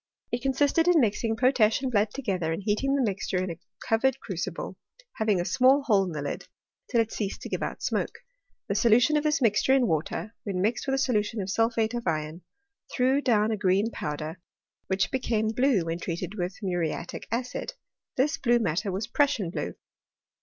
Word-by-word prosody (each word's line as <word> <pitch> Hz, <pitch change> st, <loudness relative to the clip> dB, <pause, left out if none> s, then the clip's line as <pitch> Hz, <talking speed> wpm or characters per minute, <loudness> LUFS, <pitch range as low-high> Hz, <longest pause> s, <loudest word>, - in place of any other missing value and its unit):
It 240 Hz, -, -1 dB
consisted 285 Hz, +5 st, +2 dB
in 355 Hz, -2 st, +6 dB
mixing 225 Hz, -1 st, +1 dB
potash 230 Hz, -2 st, +3 dB
and 260 Hz, -, -1 dB
blood 210 Hz, -2 st, +2 dB
together, 190 Hz, -11 st, -2 dB
and 165 Hz, +5 st, -3 dB
heating 225 Hz, +7 st, +1 dB
the 275 Hz, -, +2 dB
mixture 195 Hz, -3 st, -1 dB
in 185 Hz, -1 st, -1 dB
a 165 Hz, -, -8 dB, 0.3 s
covered 240 Hz, +3 st, +2 dB
crucible, 185 Hz, -1 st, -5 dB, 0.4 s
having 215 Hz, -4 st, +2 dB
a 175 Hz, -, -1 dB
small 265 Hz, +6 st, +4 dB
hole 205 Hz, -7 st, +3 dB
in 180 Hz, -, -4 dB
the 150 Hz, -3 st, -4 dB
lid,. 145 Hz, -, -5 dB, 0.4 s
till 235 Hz, -, +3 dB
it 225 Hz, -, -3 dB
ceased 200 Hz, -3 st, -3 dB
to -, -, -6 dB
give -, -, -3 dB
out -, -, -4 dB
smoke. -, -, -1 dB, 0.5 s
The -, -, 0 dB
solution 240 Hz, +5 st, +4 dB
of 300 Hz, -, +2 dB
this 300 Hz, -2 st, +1 dB
mix 215 Hz, -3 st, +3 dB
ture 265 Hz, -, +4 dB
in 260 Hz, -2 st, +3 dB
water, 170 Hz, +5 st, -2 dB
when 195 Hz, -5 st, -3 dB
mixed 220 Hz, +8 st, 0 dB
with 270 Hz, -, +2 dB
a -, -, -1 dB
solution 225 Hz, -4 st, 0 dB
of 190 Hz, -1 st, -3 dB
sulphate 225 Hz, +1 st, +1 dB
of 235 Hz, -4 st, -4 dB
iron, 155 Hz, +1 st, -2 dB, 0.5 s
threw 260 Hz, +2 st, +2 dB
down 220 Hz, -5 st, +2 dB
a 220 Hz, -, -1 dB
green 200 Hz, +3 st, +2 dB
powder, 155 Hz, +1 st, -5 dB, 0.5 s
which 190 Hz, 0 st, 0 dB
became 225 Hz, -4 st, 0 dB
blue 225 Hz, -5 st, +2 dB
when 165 Hz, +1 st, -3 dB
treated 170 Hz, +2 st, -4 dB
with 180 Hz, -2 st, -3 dB
muriatic 175 Hz, -3 st, -3 dB
acid: 260 Hz, -, -3 dB, 0.4 s
this 290 Hz, +5 st, +2 dB
blue 240 Hz, -2 st, +3 dB
mat 180 Hz, -8 st, 0 dB
ter 210 Hz, -, -4 dB
was 195 Hz, +4 st, -2 dB
Prussian 235 Hz, -, +1 dB
blue. -, -, -4 dB
220 Hz, 195 wpm, -27 LUFS, 185-255 Hz, 0.5 s, in